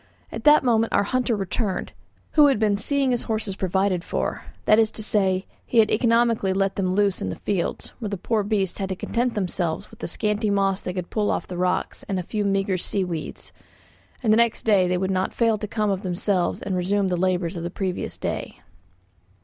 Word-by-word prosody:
At -, -, -7 dB
that 300 Hz, -1 st, +7 dB
moment 230 Hz, -2 st, +2 dB
our -, -, +4 dB
hunter 250 Hz, +2 st, 0 dB
returned, 195 Hz, +1 st, -2 dB, 0.4 s
who 300 Hz, -2 st, +6 dB
had 275 Hz, -4 st, +3 dB
been 210 Hz, -1 st, +2 dB
seeing 275 Hz, +5 st, +2 dB
his 245 Hz, -, 0 dB
horses 215 Hz, -3 st, -1 dB
provided 190 Hz, -1 st, 0 dB
for; -, -, -3 dB, 0.2 s
that 215 Hz, -, +5 dB
is 220 Hz, -1 st, +4 dB
to 215 Hz, -, -4 dB
say, 190 Hz, -3 st, +1 dB, 0.2 s
he 240 Hz, -, -3 dB
had 220 Hz, -1 st, +5 dB
economically 230 Hz, -3 st, +2 dB
let 195 Hz, 0 st, 0 dB
them 185 Hz, -2 st, 0 dB
loose 200 Hz, -2 st, +1 dB
in 95 Hz, -, -2 dB
the 95 Hz, -, -4 dB
fields, 195 Hz, -4 st, -3 dB
where 220 Hz, -4 st, -3 dB
the 200 Hz, -, -3 dB
poor 215 Hz, +4 st, 0 dB
beasts 200 Hz, -3 st, -1 dB
had 195 Hz, -1 st, -2 dB
to 190 Hz, -, -2 dB
content 240 Hz, +5 st, -1 dB
themselves 180 Hz, -2 st, -2 dB
with 225 Hz, -, -15 dB
the -, -, -4 dB
scanty 210 Hz, 0 st, 0 dB
moss 195 Hz, -1 st, +1 dB
they 180 Hz, -, -4 dB
could 180 Hz, -2 st, -5 dB
pull 210 Hz, -2 st, 0 dB
off -, -, -1 dB
the 180 Hz, -, -7 dB
rocks 180 Hz, +1 st, -1 dB
and 195 Hz, -, 0 dB
a 180 Hz, -, -2 dB
few 210 Hz, +4 st, -2 dB
meagre 195 Hz, -2 st, 0 dB
sea 195 Hz, +2 st, -1 dB
weeds, 170 Hz, -4 st, -6 dB, 0.7 s
and 215 Hz, -2 st, +4 dB
the -, -, +4 dB
next 235 Hz, -1 st, +2 dB
day 200 Hz, -5 st, +4 dB
they 180 Hz, 0 st, +1 dB
would 190 Hz, +1 st, -1 dB
not 185 Hz, 0 st, -1 dB
fail 225 Hz, -3 st, +2 dB
to 210 Hz, -, -4 dB
come 210 Hz, -1 st, 0 dB
of 195 Hz, -1 st, -2 dB
themselves 185 Hz, 0 st, -1 dB
and 195 Hz, -2 st, -2 dB
resume 195 Hz, +2 st, +1 dB
the 180 Hz, -, +1 dB
labours 180 Hz, -1 st, 0 dB
of 170 Hz, -, -4 dB
the 170 Hz, -, -3 dB
previous 185 Hz, 0 st, -3 dB
day. -, -, -4 dB
200 Hz, 220 wpm, -24 LUFS, 185-220 Hz, 0.7 s, that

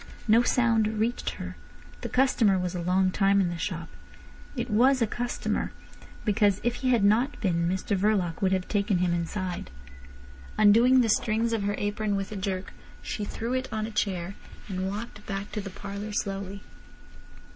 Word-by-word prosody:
No 225 Hz, +2 st, +6 dB
sound 225 Hz, -3 st, +2 dB
reached 235 Hz, +3 st, 0 dB
her. -, -, -7 dB, 0.5 s
The -, -, -4 dB
customer 245 Hz, -6 st, +3 dB
was 180 Hz, -1 st, -2 dB
a 180 Hz, -, -3 dB
long 185 Hz, +2 st, +2 dB
time 195 Hz, +1 st, +3 dB
in 185 Hz, -3 st, +2 dB
the 175 Hz, -, -4 dB
shop. 170 Hz, -2 st, -3 dB, 0.7 s
It 240 Hz, -1 st, -2 dB
was 255 Hz, +4 st, +4 dB
a 230 Hz, -, +3 dB
customer, 240 Hz, +3 st, -2 dB, 0.5 s
because 205 Hz, -2 st, +3 dB
if 240 Hz, 0 st, 0 dB
he 255 Hz, -, -1 dB
had 235 Hz, -5 st, +3 dB
not 230 Hz, +8 st, +3 dB
been 170 Hz, -5 st, +1 dB
Mr 190 Hz, +3 st, -1 dB
Verloc 190 Hz, -4 st, +1 dB
would 190 Hz, -1 st, +2 dB
have 185 Hz, -1 st, 0 dB
taken 200 Hz, -2 st, +1 dB
him 175 Hz, -1 st, +1 dB
inside. 175 Hz, -, -3 dB, 0.9 s
Undoing 230 Hz, +5 st, +6 dB
the 235 Hz, -, +2 dB
strings 225 Hz, +2 st, +1 dB
of 225 Hz, -, 0 dB
her 205 Hz, 0 st, 0 dB
apron 205 Hz, 0 st, -1 dB
with 195 Hz, 0 st, -3 dB
a -, -, -5 dB
jerk, 190 Hz, -1 st, -3 dB, 0.3 s
she 210 Hz, -, -3 dB
threw 230 Hz, +4 st, -4 dB
it 260 Hz, 0 st, -1 dB
on 215 Hz, -1 st, -2 dB
a 225 Hz, -, -6 dB
chair, 190 Hz, -3 st, -1 dB, 0.3 s
and 190 Hz, -1 st, -2 dB
walked 210 Hz, +1 st, -6 dB
back 195 Hz, 0 st, -4 dB
to 210 Hz, -, -3 dB
the 195 Hz, -, -6 dB
parlour 200 Hz, +2 st, -6 dB
slowly. 195 Hz, 0 st, -3 dB
205 Hz, 180 wpm, -27 LUFS, 190-225 Hz, 0.9 s, No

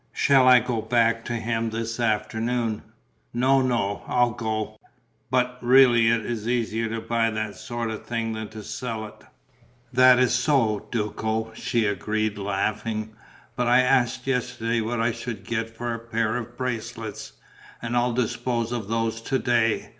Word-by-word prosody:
Shall 135 Hz, -2 st, +4 dB
I 125 Hz, -1 st, +8 dB
go 120 Hz, -2 st, -2 dB
back 115 Hz, 0 st, +2 dB
to 120 Hz, -, -3 dB
him 115 Hz, 0 st, -1 dB
this 115 Hz, +1 st, -4 dB
afternoon?" 115 Hz, 0 st, -1 dB, 0.5 s
"No, 130 Hz, +2 st, +4 dB
no, 115 Hz, -6 st, 0 dB
I'll 125 Hz, -1 st, +2 dB
go. 110 Hz, -1 st, -3 dB, 0.5 s
But, 125 Hz, 0 st, 0 dB
really 120 Hz, -2 st, +6 dB
it 115 Hz, -1 st, +2 dB
is 115 Hz, -2 st, -4 dB
easier 115 Hz, -2 st, 0 dB
to 115 Hz, +1 st, -3 dB
buy 115 Hz, 0 st, +1 dB
that 110 Hz, -1 st, -3 dB
sort 120 Hz, -1 st, -4 dB
of 110 Hz, -, -6 dB
thing 115 Hz, -1 st, -2 dB
than 110 Hz, 0 st, -5 dB
to 110 Hz, 0 st, -10 dB
sell 110 Hz, +1 st, -4 dB
it." 105 Hz, -, -13 dB, 0.7 s
"That 130 Hz, 0 st, +7 dB
is 125 Hz, -1 st, +3 dB
so, 125 Hz, -5 st, +1 dB
Duco," 110 Hz, 0 st, -2 dB
she 115 Hz, 0 st, 0 dB
agreed, 105 Hz, +1 st, -1 dB
laughing. 105 Hz, +2 st, -2 dB, 0.4 s
"But 125 Hz, -1 st, 0 dB
I 125 Hz, +1 st, +6 dB
asked 125 Hz, -1 st, +2 dB
yesterday 120 Hz, -3 st, -1 dB
what 115 Hz, +2 st, -2 dB
I 115 Hz, +1 st, +2 dB
should 115 Hz, -3 st, -6 dB
get 115 Hz, +2 st, -2 dB
for 120 Hz, 0 st, -2 dB
a 115 Hz, -, -4 dB
pair 115 Hz, -1 st, -1 dB
of 120 Hz, 0 st, -6 dB
bracelets; 115 Hz, -3 st, -5 dB, 0.5 s
and 120 Hz, 0 st, -3 dB
I'll 120 Hz, 0 st, +2 dB
dispose 120 Hz, -1 st, -1 dB
of 115 Hz, -5 st, -3 dB
those 115 Hz, 0 st, -1 dB
to 135 Hz, +3 st, 0 dB
day. 120 Hz, -3 st, +1 dB
115 Hz, 160 wpm, -25 LUFS, 110-120 Hz, 0.7 s, I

